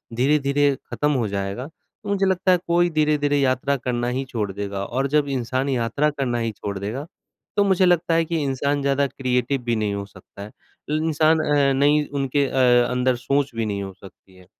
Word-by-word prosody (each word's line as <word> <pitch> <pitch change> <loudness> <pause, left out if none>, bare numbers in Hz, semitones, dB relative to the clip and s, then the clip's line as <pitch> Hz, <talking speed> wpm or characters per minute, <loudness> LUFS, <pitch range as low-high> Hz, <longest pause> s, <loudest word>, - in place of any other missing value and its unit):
धीरे-धीरे 140 +2 +2 0.2
खत्म 150 0 0
हो 125 -6 0
जाएगा, 100 +4 -4
तो 190 +5 -14
मुझे 200 -1 +1
लगता 190 0 +2
है 180 - +5
कोई 175 +1 +3
धीरे-धीरे 150 -2 +1
यात्रा 135 +1 +1
करना 120 -1 -2
ही 135 - -1
छोड़ 110 -6 -3
देगा 100 0 -4
और 135 +5 -1
जब 145 +1 +1
इंसान 130 +2 -1
यात्रा 130 +4 +1
करना 135 -5 -2
ही 115 -1 -1
छोड़ 100 -1 -6
देगा, 110 +9 -4 0.5
तो 205 - +5
मुझे 190 -2 +3
लगता 175 -2 +2
है 165 0 +2
कि 165 -1 -2
इंसान 140 +1 -1
ज़्यादा 140 0 +1
क्रिएटिव 130 0 -1
भी 120 -1 0
नहीं 105 -2 -1
हो 100 0 -4
सकता 100 0 -15
है। 105 +1 -8 0.5
इंसान 160 0 +2
अ, 145 -3 +2
नई 145 +2 +3
उनके 140 0 0
अ, 125 -2 +3
अंदर 125 0 +1
सोच 140 +3 -1
भी 115 -1 -1
नहीं 100 -2 -3
हो 95 -1 -7
सकती 95 0 -17
है। 90 0 -17
135 Hz, 195 wpm, -22 LUFS, 120-150 Hz, 0.5 s, है